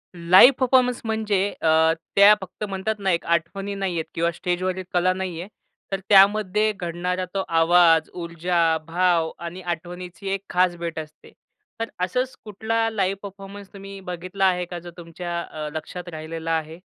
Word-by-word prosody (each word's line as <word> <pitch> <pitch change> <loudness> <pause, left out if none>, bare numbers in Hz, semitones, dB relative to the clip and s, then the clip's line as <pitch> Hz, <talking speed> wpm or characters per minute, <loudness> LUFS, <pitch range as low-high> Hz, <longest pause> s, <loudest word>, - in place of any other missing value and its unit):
Live 185 +10 +7
performance 250 -1 +3
म्हणजे 215 -3 0
अ, 160 0 +4 0.2
त्या 200 +1 +8
फक्त 190 +2 -8
म्हणतात 195 +2 -2
ना, 195 -2 +1
एक 170 - -1
आठवणी 195 +4 -1
नाहीयेत 180 -5 -2
किंवा 170 +1 0
स्टेजवरील 185 +2 -2
कला 180 +1 +3
नाहीये. 185 -2 -5 0.4
तर 195 - -1
त्यामध्ये 210 +1 +5
घडणारा 180 +1 -2
तो 195 -1 -1
आवाज, 165 -1 +4
ऊर्जा, 170 -1 0
भाव 170 -1 +1
आणि 170 +2 -7
आठवणीची 180 +2 -6
एक 195 - -2
खास 180 -1 +2
भेट 170 -1 -4
असते. 155 -1 -11 0.5
तर 230 - -2 0.2
असंच 250 +8 -1
कुठला 225 +2 -1
लाईव्ह 195 -3 -1
परफॉर्मन्स 200 0 -10
तुम्ही 195 0 -9
बघितला 185 +2 -2
आहे 180 -1 +2
का, 175 0 -7
जो 175 0 -10
तुमच्या 170 0 -5
अ, 155 -2 -6
लक्षात 175 +3 -6
राहिलेला 160 +1 -5
आहे? 160 0 -2
180 Hz, 150 wpm, -23 LUFS, 170-195 Hz, 0.5 s, त्या